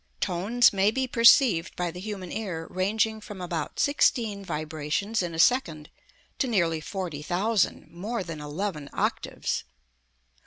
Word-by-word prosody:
Tones 210 Hz, +8 st, +3 dB
may 195 Hz, +1 st, +3 dB
be 265 Hz, +4 st, 0 dB
perceived 230 Hz, -, +5 dB
by 175 Hz, -1 st, -2 dB
the 180 Hz, -, -9 dB
human 190 Hz, -2 st, -6 dB
ear 180 Hz, -7 st, -4 dB
ranging 220 Hz, +4 st, 0 dB
from 210 Hz, -2 st, -9 dB
about 170 Hz, -4 st, -4 dB
sixteen 225 Hz, -8 st, +2 dB
vibrations 155 Hz, +6 st, -2 dB
in 170 Hz, -2 st, -4 dB
a -, -, -5 dB
second 165 Hz, -, +2 dB, 0.5 s
to 265 Hz, -, +1 dB
nearly 170 Hz, -8 st, +1 dB
forty 175 Hz, -4 st, -5 dB
thousand, 190 Hz, +5 st, 0 dB
more 200 Hz, +5 st, -4 dB
than 165 Hz, -3 st, -7 dB
eleven 150 Hz, 0 st, -4 dB
octaves. -, -, -2 dB
190 Hz, 140 wpm, -27 LUFS, 165-220 Hz, 0.5 s, perceived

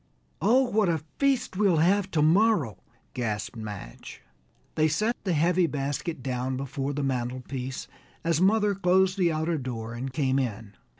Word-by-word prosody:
"Oh, 255 Hz, +4 st, +5 dB
what 215 Hz, -6 st, +1 dB
a 160 Hz, -3 st, -1 dB, 0.2 s
feast 275 Hz, -8 st, +1 dB
we'll 195 Hz, -5 st, +3 dB
have 190 Hz, +4 st, +3 dB
tomorrow," 160 Hz, -, +3 dB, 0.3 s
gasped 110 Hz, -4 st, -3 dB
Madge. 105 Hz, -, -8 dB, 0.5 s
They 155 Hz, 0 st, +3 dB
set 215 Hz, +10 st, 0 dB
the 185 Hz, -, +1 dB
heavy 170 Hz, +3 st, +3 dB
basket 145 Hz, +1 st, -3 dB
down 130 Hz, 0 st, -2 dB
before 135 Hz, +1 st, -3 dB
the 145 Hz, 0 st, -2 dB
mantel 130 Hz, -1 st, -2 dB
piece, 130 Hz, +1 st, -5 dB, 0.4 s
as 165 Hz, 0 st, +1 dB
mother 210 Hz, +1 st, +3 dB
closed 190 Hz, 0 st, +3 dB
the 175 Hz, -2 st, +3 dB
outer 160 Hz, +1 st, -1 dB
door 115 Hz, -3 st, -5 dB
and 130 Hz, +3 st, -5 dB
came 135 Hz, -1 st, +1 dB
in. 110 Hz, -5 st, -4 dB
155 Hz, 155 wpm, -27 LUFS, 130-185 Hz, 0.5 s, Oh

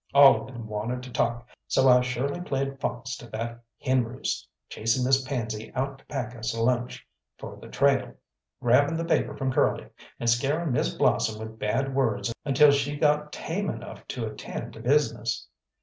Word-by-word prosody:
All 140 Hz, -1 st, +8 dB
of -, -, -9 dB
them 120 Hz, -4 st, -8 dB
wanted 110 Hz, +4 st, -3 dB
to 125 Hz, -, -9 dB
talk, 120 Hz, 0 st, 0 dB, 0.2 s
so 135 Hz, -, +3 dB
I 125 Hz, -1 st, +7 dB
surely 130 Hz, +6 st, -2 dB
played 135 Hz, -3 st, -2 dB
fox 125 Hz, -1 st, -3 dB
to 120 Hz, -, -11 dB
that 115 Hz, +1 st, -4 dB, 0.2 s
hen 130 Hz, -1 st, +2 dB
roost, 120 Hz, +3 st, -4 dB, 0.2 s
chasing 115 Hz, +3 st, 0 dB
Miss 135 Hz, +1 st, +4 dB
Pansy 115 Hz, -5 st, -4 dB
out 135 Hz, +1 st, -2 dB
to -, -, -23 dB
pack 125 Hz, -4 st, -4 dB
us 115 Hz, 0 st, -3 dB
a 115 Hz, -, 0 dB
lunch 125 Hz, 0 st, 0 dB, 0.3 s
for -, -, -8 dB
the -, -, -11 dB
trail, 140 Hz, -2 st, +2 dB, 0.5 s
grabbing 145 Hz, +6 st, +4 dB
the 165 Hz, -, -2 dB
paper 165 Hz, -, +1 dB
from 135 Hz, -1 st, -1 dB
Curly, -, -, +2 dB, 0.3 s
and 120 Hz, -, -2 dB
scaring 140 Hz, +7 st, +2 dB
Miss 120 Hz, -, +1 dB
Blossom 110 Hz, -1 st, +1 dB
with 110 Hz, 0 st, -8 dB
bad 135 Hz, +6 st, 0 dB
words 120 Hz, -3 st, 0 dB
until 145 Hz, +1 st, +6 dB
she 140 Hz, +1 st, 0 dB
got 150 Hz, 0 st, +2 dB
tame 190 Hz, +3 st, -3 dB
enough -, -, -7 dB
to 120 Hz, -3 st, -3 dB
attend 110 Hz, -1 st, -6 dB
to -, -, -11 dB
business. 120 Hz, -3 st, +1 dB
125 Hz, 180 wpm, -27 LUFS, 115-140 Hz, 0.5 s, All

